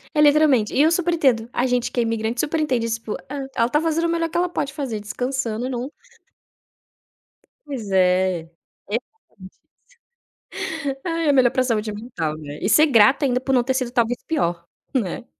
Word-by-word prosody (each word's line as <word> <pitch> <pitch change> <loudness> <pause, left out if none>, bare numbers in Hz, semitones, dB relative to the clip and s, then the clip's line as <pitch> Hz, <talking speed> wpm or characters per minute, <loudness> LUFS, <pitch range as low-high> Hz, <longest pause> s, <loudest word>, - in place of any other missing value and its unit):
É 300 - +4
literalmente. 290 -7 +4
E - - +3
eu 315 +2 +5
super 345 0 +1
entendo. 255 -8 +2
A 245 - +1
gente 250 -1 0
que 245 - -2
é - - +3
imigrante 225 +1 -2
super 310 +1 0
entende 255 -7 0
iss 225 0 -1
pô, 215 -2 -5
ah, 275 -1 -4
ela 230 - +3
está 295 +5 +1
fazendo 325 +1 0
o - - -2
melhor 335 0 0
que 335 - -3
ela 355 0 +1
pode 280 -5 -3
fazer, 265 -8 -4
descansando 245 +2 -3
num 250 +1 -4 1.8
Pois 240 -8 -6
é. 185 -1 +2 0.5
É 210 - -1
exatamente 230 - -10
isso. - - -33 1.1
Ai, 330 -2 -1
é - - +7
melhor 255 -3 +4
para 255 - +1
a - - +3
saúde 220 -3 -1
mental, 205 -9 -4
né. 150 -1 -8
E 195 - 0
ser 305 +7 +6
grata 265 +3 +5
ainda 250 -2 +1
por 265 +1 -2
não 250 -2 +4
ter 260 +2 0
sido 255 -2 -2
talvez 240 0 0
pior, 175 - -1 0.3
né. 230 -4 -2
250 Hz, 200 wpm, -22 LUFS, 220-290 Hz, 1.8 s, é